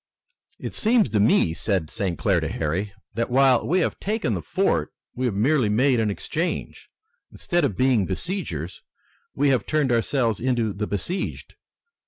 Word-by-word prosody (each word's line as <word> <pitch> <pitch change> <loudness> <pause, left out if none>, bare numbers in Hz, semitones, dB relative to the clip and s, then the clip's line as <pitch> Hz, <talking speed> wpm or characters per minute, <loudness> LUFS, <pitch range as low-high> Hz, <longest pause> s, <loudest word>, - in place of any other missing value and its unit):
"It - - -6
seems 220 - +2
to 105 - +2
me," 100 -5 +3
said 90 -2 -1
St. 90 -5 -2
Clair - - +2
to - - -2
Harry, 85 +7 -2 0.2
"that 115 +3 -2
while 130 -1 +4
we 180 +4 +2
have - - -1
taken 210 - -1
the 90 - -2
fort 75 - 0 0.2
we 130 +1 -1
have 110 - -2
merely 125 +2 +2
made 125 +4 +3
an 110 -1 +1
exchange. 165 - -4 0.4
Instead 175 -1 -1
of 105 -10 0
being 125 -7 +3
besiegers 95 - -4 0.5
we 140 +1 +2
have 130 -6 +1
turned 150 -4 +1
ourselves 115 -2 +1
into 120 -4 0
the 105 +2 -3
besieged." 170 - -4
115 Hz, 165 wpm, -24 LUFS, 100-140 Hz, 0.5 s, while